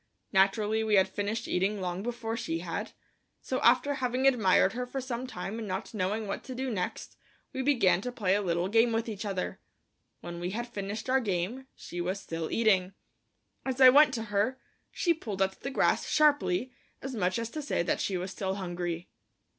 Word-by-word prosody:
Naturally 210 +3 +3
we 215 -1 +2
had 190 -1 +5
finished 215 +3 -3
eating 195 +3 0
long 180 0 -3
before 230 0 -3
she 230 -8 -2
had, 175 +5 -4 0.5
so 260 - -2
after 255 +4 +4
having 255 -1 -1
admired 215 -7 +4
her 250 +1 -3
for 270 +2 -4
some 255 -1 -4
time 220 -1 -5
and 220 - -5
not 190 +4 -4
knowing 210 +2 -1
what 200 - -4
to 255 - -6
do 260 0 -2
next, 180 -5 -4 0.4
we 260 - -2
began 235 -10 +3
to 250 - -4
play 200 -6 +1
a 205 - +2
little 175 -1 0
game 225 +3 +3
with 225 +1 0
each 215 -2 -5
other. 195 -3 -3 0.6
When 170 0 -7
we 175 +1 -2
had 235 +5 -3
finished 205 0 -5
our 260 +1 +3
game, 215 +4 -2
she 175 - -6
was 185 +3 -2
still 165 -4 -4
eating. 195 -5 +2 0.7
As 265 -1 -3
I 260 -1 +10
went 290 +2 +7
to 225 - -3
her, 215 +6 +1 0.3
she 345 - +1
pulled 215 - -6
at 190 0 -3
the 275 - -3
grass 270 - +1
sharply, 285 -7 +3 0.3
as 265 0 -4
much 185 -3 0
as 230 0 -3
to 310 - -4
say 285 -11 0
that - - 0
she 190 - -1
was 180 +1 -4
still 190 -1 -2
hungry. 175 -2 -4
215 Hz, 200 wpm, -29 LUFS, 190-250 Hz, 0.7 s, I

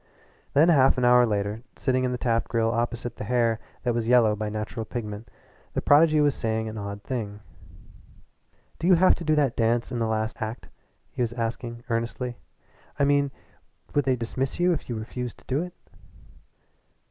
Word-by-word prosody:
Then 155 +5 +6
half 135 -5 +5
an 125 - +2
hour 125 0 +6
later, 105 +1 -2
sitting 130 -1 0
in 125 - 0
the 125 - -2
Taft 115 -1 0
Grill 115 -1 +1
opposite 120 +1 -2
the - - -5
hair 115 0 +1 0.2
that 120 -2 +1
was 115 -1 -1
yellow 120 -3 +5
by 105 0 -3
natural 110 +1 -4
pigment, 110 -2 -6 0.4
the - - 0
prodigy 155 +1 +5
was 145 -2 +4
saying 110 -2 -2
an 110 - -6
odd 100 0 -6
thing. 105 -5 -4 1.4
"Do 170 - -1
you 185 - +7
have 185 +2 +5
to 170 - -6
do 155 -1 +2
that 140 -5 +2
dance 115 +2 +1
in 120 - -2
the 115 - +1
last 110 +1 -2
act?" 110 +2 -5 0.4
he - - -4
was 120 -1 0
asking 115 0 -4
earnestly 120 +1 -3 0.6
"I 140 - +3
mean, 140 0 +3 0.6
would 145 - +2
they 130 -1 +3
dismiss 125 +4 -3
you 175 0 +4
if 155 - -5
you 120 - -2
refused 120 +3 -5
to - - -21
do 135 +4 0
it?" 180 0 -7
120 Hz, 185 wpm, -26 LUFS, 110-135 Hz, 1.4 s, you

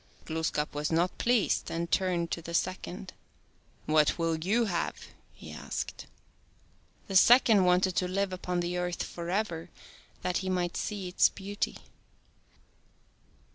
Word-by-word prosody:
Glooskap 160 -2 -2
was 150 +2 -2
not 170 +3 +1
pleased, 240 -3 +2
and 170 +1 -3
turned 175 -3 +1
to 170 - -2
the 170 +1 -5
second. 185 +1 -3 0.4
" - - -35
What 155 -1 +3
will 165 -1 0
you 225 +6 +2
have? 175 -5 -1 0.2
" - - -35
he - - -9
asked. - - -5 1.0
The 195 - -5
second 225 -1 +7
wanted 180 0 +3
to 180 - +2
live 195 +1 -1
upon 180 -1 -2
the 175 +1 -2
earth 180 -1 -2
forever 175 -1 -3 0.5
that 180 -1 0
he 190 - -3
might 180 -2 -1
see 200 -3 -3
its 180 - +4
beauty. 200 +1 -4
180 Hz, 140 wpm, -29 LUFS, 170-190 Hz, 1.0 s, second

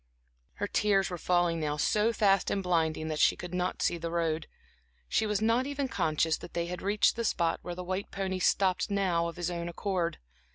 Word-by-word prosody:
Her - - -3
tears 195 -2 +2
were 175 - -3
falling 175 -1 +1
now 150 -1 -1
so 210 +8 +2
fast 195 -4 +3
and 195 - -1
blinding 160 -3 0
that 155 -1 -2
she - - +5
could 180 0 -8
not 180 0 -1
see 170 - +1
the 165 0 -3
road; 165 -2 -1 0.6
she 220 - +1
was 210 0 0
not 235 +4 +2
even 285 -1 -2
conscious 160 -6 +1
that - - -11
they 170 0 0
had 180 +1 -5
reached 205 +2 +2
the 230 - -2
spot 170 -6 +1
where 175 - -6
the 180 - -5
white 185 +2 -3
pony 190 -1 -3
stopped 185 +1 +2
now 185 -4 +1
of 170 - -6
his 175 0 -2
own 170 0 -3
accord. 175 -2 -2
180 Hz, 210 wpm, -30 LUFS, 170-200 Hz, 0.6 s, she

